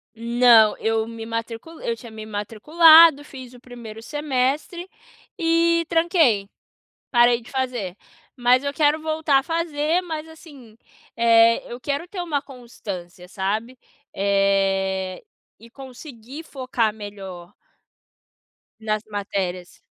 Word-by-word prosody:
Não. 235 Hz, -1 st, +4 dB
Eu 225 Hz, 0 st, -1 dB
me 230 Hz, -1 st, -8 dB
matriculei 230 Hz, +7 st, -6 dB
eu 230 Hz, -, -1 dB
tinha 230 Hz, 0 st, -12 dB
me 220 Hz, 0 st, -9 dB
matriculado. 300 Hz, +9 st, +5 dB
Fiz 260 Hz, -4 st, -12 dB
1º 235 Hz, -3 st, -11 dB
semestre 295 Hz, +6 st, -2 dB, 0.5 s
e 335 Hz, 0 st, +2 dB
tranquei. 325 Hz, -, +2 dB, 0.6 s
Parei 240 Hz, -1 st, +4 dB
de 230 Hz, -, -15 dB
fazer. 250 Hz, -9 st, -3 dB, 0.4 s
Mas 250 Hz, +1 st, +3 dB
eu 280 Hz, 0 st, -3 dB
quero 300 Hz, +1 st, +2 dB
voltar 310 Hz, -3 st, +1 dB
a 270 Hz, -, -6 dB
fazer, 330 Hz, 0 st, -1 dB
mas, 320 Hz, -3 st, -6 dB
assim, 280 Hz, -9 st, -15 dB, 0.4 s
eh, 230 Hz, 0 st, +5 dB
eu 240 Hz, -, -7 dB
quero 285 Hz, +6 st, -3 dB
ter 370 Hz, -1 st, -6 dB
uma 305 Hz, -5 st, -2 dB
constância, 200 Hz, -9 st, -10 dB
sabe? 215 Hz, +7 st, -3 dB, 0.4 s
Eh, 195 Hz, -1 st, 0 dB, 0.4 s
e 230 Hz, -, -16 dB
conseguir 265 Hz, +1 st, -11 dB
focar 255 Hz, -7 st, -2 dB
melhor 195 Hz, -4 st, -10 dB, 1.3 s
nas 215 Hz, -1 st, -2 dB
matérias. 190 Hz, -3 st, -4 dB
240 Hz, 115 wpm, -22 LUFS, 215-300 Hz, 1.3 s, matriculado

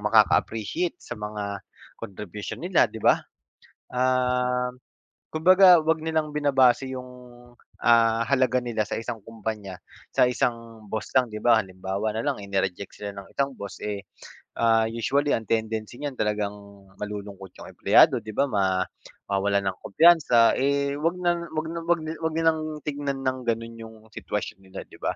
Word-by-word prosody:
makaka-appreciate 110 Hz, -, +2 dB
sa -, -, -9 dB
mga 105 Hz, -1 st, -5 dB, 0.4 s
contribution 105 Hz, +1 st, -7 dB
nila, 175 Hz, -, +3 dB
'di 110 Hz, -, -8 dB
ba? -, -, +6 dB, 0.8 s
Um, 125 Hz, 0 st, +1 dB, 0.5 s
kumbaga 180 Hz, +2 st, +7 dB
'wag 160 Hz, 0 st, +1 dB
nilang 160 Hz, -2 st, -1 dB
binabase 135 Hz, -3 st, +3 dB
yung, 125 Hz, -1 st, -6 dB, 0.7 s
ah, 115 Hz, -1 st, +4 dB
halaga 130 Hz, -2 st, +2 dB
nila 115 Hz, -3 st, -1 dB
sa -, -, -3 dB
isang 115 Hz, -1 st, -5 dB
kumpanya, 105 Hz, -4 st, -6 dB, 0.4 s
sa -, -, +5 dB
isang 115 Hz, -3 st, -3 dB
boss 110 Hz, -, -4 dB
lang, 130 Hz, -1 st, +5 dB
'di 110 Hz, -, -4 dB
ba? 120 Hz, -2 st, +5 dB
Halimbawa 95 Hz, +2 st, -4 dB
nalang 135 Hz, +3 st, -1 dB
eh 100 Hz, -, -9 dB
ni-reject 95 Hz, 0 st, -2 dB
sila 100 Hz, -1 st, -6 dB
ng 100 Hz, -1 st, -10 dB
isang 140 Hz, 0 st, 0 dB
boss 100 Hz, -1 st, -7 dB
eh, 100 Hz, -2 st, -3 dB, 0.6 s
ah, 115 Hz, -1 st, +4 dB
usually 140 Hz, +5 st, 0 dB
ang 110 Hz, -2 st, -3 dB
tendency 110 Hz, 0 st, -2 dB
niyan 145 Hz, -2 st, -4 dB
talagang 105 Hz, -1 st, 0 dB, 0.5 s
malulungkot 100 Hz, -2 st, -7 dB
yung -, -, -10 dB
empleyado, -, -, +5 dB
'di 110 Hz, -, -8 dB
ba, -, -, +3 dB
ma 100 Hz, -4 st, +1 dB, 0.6 s
mawawalan 100 Hz, 0 st, +1 dB
ng 95 Hz, -, -22 dB
kumpiyansa 140 Hz, -5 st, +5 dB
eh, 140 Hz, +1 st, +1 dB
'wag 165 Hz, +4 st, 0 dB
na 175 Hz, -1 st, +2 dB
'wag 160 Hz, 0 st, -3 dB
na 170 Hz, -, -3 dB
'wag 170 Hz, 0 st, +2 dB, 0.2 s
'wag 160 Hz, 0 st, -1 dB
nilang 160 Hz, -1 st, 0 dB
tingnan 140 Hz, -2 st, -3 dB
ng 130 Hz, 0 st, 0 dB
gano'n 115 Hz, 0 st, -2 dB
yung 110 Hz, 0 st, -11 dB, 0.2 s
sitwasyon 105 Hz, -, -4 dB
nila, 95 Hz, -, -8 dB
'di -, -, -15 dB
ba? -, -, 0 dB
115 Hz, 155 wpm, -25 LUFS, 105-140 Hz, 0.8 s, kumbaga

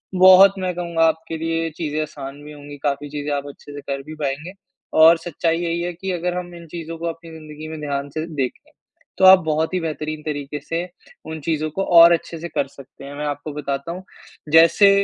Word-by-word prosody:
बहुत 185 Hz, +1 st, +8 dB
मैं 185 Hz, -1 st, -2 dB
कहूँगा 170 Hz, -2 st, 0 dB
आपके 160 Hz, 0 st, -1 dB
लिए 165 Hz, 0 st, -1 dB
चीज़ें 155 Hz, -2 st, -2 dB
आसान 145 Hz, -2 st, -7 dB
भी 150 Hz, -, -10 dB
होंगी। 145 Hz, 0 st, -11 dB
काफ़ी 145 Hz, 0 st, -1 dB
चीज़ें 145 Hz, 0 st, -4 dB
आप 140 Hz, 0 st, -4 dB
अच्छे 145 Hz, 0 st, -12 dB
से 145 Hz, -, -7 dB
कर 140 Hz, 0 st, -4 dB
भी 155 Hz, +2 st, -9 dB
पाएँगे 145 Hz, +6 st, -3 dB, 0.5 s
और 165 Hz, +1 st, +8 dB
सच्चाई 165 Hz, 0 st, -1 dB
यही 170 Hz, 0 st, -2 dB
है 175 Hz, -, -2 dB
कि 190 Hz, +2 st, -5 dB
अगर 180 Hz, 0 st, -2 dB
हम 175 Hz, -1 st, -6 dB
इन 170 Hz, -1 st, -12 dB
चीज़ों 165 Hz, 0 st, -7 dB
को 170 Hz, -, -6 dB
अपनी 165 Hz, 0 st, -7 dB
ज़िंदगी 155 Hz, -1 st, -10 dB
में 160 Hz, -1 st, -7 dB
ध्यान 140 Hz, -1 st, -3 dB
से 155 Hz, +3 st, -4 dB
देखें, 130 Hz, -3 st, -4 dB, 0.5 s
तो 190 Hz, -, +4 dB
आप 190 Hz, 0 st, +10 dB
बहुत 160 Hz, +2 st, 0 dB
ही 185 Hz, -, +1 dB
बेहतरीन 155 Hz, -1 st, -4 dB
तरीके 145 Hz, -1 st, -4 dB
से 170 Hz, +4 st, -3 dB, 0.4 s
उन 160 Hz, 0 st, -6 dB
चीज़ों 155 Hz, +1 st, -1 dB
को 195 Hz, +5 st, -2 dB, 0.2 s
और 170 Hz, +1 st, +9 dB
अच्छे 165 Hz, 0 st, -3 dB
से 170 Hz, -, -5 dB
कर 140 Hz, -, -1 dB
सकते 135 Hz, 0 st, -14 dB
हैं। 140 Hz, -, -8 dB
मैं 150 Hz, +1 st, -4 dB
आपको 145 Hz, +1 st, -4 dB
बताता 140 Hz, +1 st, -4 dB
हूँ, 180 Hz, +2 st, -7 dB, 0.5 s
जैसे 165 Hz, +5 st, +7 dB
160 Hz, 215 wpm, -21 LUFS, 145-170 Hz, 0.5 s, आप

